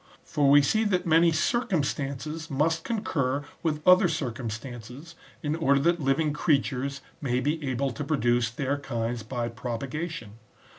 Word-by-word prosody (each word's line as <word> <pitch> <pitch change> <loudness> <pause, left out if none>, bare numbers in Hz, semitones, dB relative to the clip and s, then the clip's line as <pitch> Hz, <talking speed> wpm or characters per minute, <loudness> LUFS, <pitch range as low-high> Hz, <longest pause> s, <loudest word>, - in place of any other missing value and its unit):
For 145 -2 +2
we 145 +1 +7
see 220 +11 +2
that 185 -4 +1
many 165 +1 +5
circumstances 155 - -1
must 160 +3 +1
concur 145 - -1 0.2
with 155 -1 -2
other 185 +1 +7
cir 150 -6 -2
cumstances, 120 +5 -7 0.3
in 150 +1 0
order 140 -4 +3
that 170 +2 +2
living 145 +2 +1
creatures 140 -3 0 0.2
may 125 -3 0
be 150 +4 -1
able 130 +1 -1
to 145 - -5
pro 150 +1 0
duce 120 -1 +2
their 140 +4 -2
kinds 120 -3 -3
by 120 +2 -3
propagation. 120 +1 -5
140 Hz, 150 wpm, -27 LUFS, 125-160 Hz, 0.3 s, we